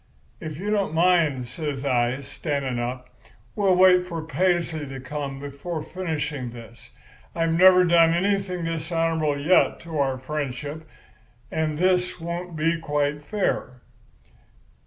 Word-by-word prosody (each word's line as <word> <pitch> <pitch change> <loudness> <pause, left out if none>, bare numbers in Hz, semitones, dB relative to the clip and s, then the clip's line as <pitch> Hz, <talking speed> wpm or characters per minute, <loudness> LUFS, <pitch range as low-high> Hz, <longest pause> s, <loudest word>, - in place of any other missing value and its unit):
"'If 155 -3 -6
you 205 +5 -3
don't 200 -6 0
mind,' 165 -7 +3
says 140 +1 -5
I, 125 0 +1
standing 140 -2 -3
up, 125 +1 -4 0.5
'we'll 195 -3 +3
wait 180 0 +5
for 165 -3 -5
Paisley 165 -1 0
to 135 0 -7
come 135 +1 -5
before 145 +3 -5
finishing 155 -7 -3
this. 115 -1 -12 0.5
I've 165 -1 +1
never 185 +1 +7
done 170 -2 +5
anything 185 0 0
dishonourable 165 -2 -1
yet 165 +6 +3
to 165 -3 -5
our 135 -2 +1
friendship, 145 +2 -5 0.6
and 155 -1 -1
this 180 +1 +1
won't 170 +1 -5
be 165 +2 +1
quite 145 -2 -1
fair. 135 - -2
160 Hz, 130 wpm, -24 LUFS, 140-175 Hz, 0.6 s, never